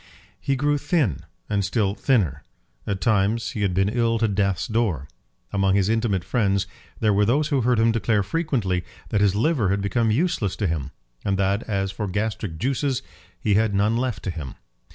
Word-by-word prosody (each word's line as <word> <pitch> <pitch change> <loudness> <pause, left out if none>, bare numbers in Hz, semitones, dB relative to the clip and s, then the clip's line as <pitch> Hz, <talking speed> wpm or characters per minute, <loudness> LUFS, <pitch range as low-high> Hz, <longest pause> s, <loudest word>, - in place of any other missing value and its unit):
He 140 - 0
grew 145 +2 +1
thin, 145 - 0 0.2
and 100 -1 0
still 100 0 +1
thinner. 95 - +1 0.5
At 100 -2 -2
times 110 0 +1
he 105 - -4
had 95 -3 +1
been 95 +1 +3
ill 115 +1 +1
to 115 - +2
death's 100 -3 0
door. 105 - -1 0.5
Among 95 -1 +2
his 100 0 +2
intimate 110 -5 +1
friends 100 -3 +1 0.3
there 105 -2 +3
were 100 +1 +3
those 140 +8 +2
who 140 -4 +2
heard 120 0 +2
him 115 +1 +4
declare 110 -2 +1
frequently 105 - -1 0.3
that 105 -3 +1
his 100 -1 +3
liver 115 - +2
had 100 +1 +1
become 115 +3 +1
useless 120 - +1
to 105 - -2
him; 80 -5 -1 0.3
and 100 -1 0
that, 100 +2 +1
as 95 -2 0
for 105 +2 -4
gastric 105 -3 -2
juices, 135 - -1 0.4
he 105 -4 +1
had 105 0 +2
none 105 +3 +2
left 120 -5 -2
to 95 - -2
him. 75 -6 -7
105 Hz, 190 wpm, -24 LUFS, 95-120 Hz, 0.5 s, him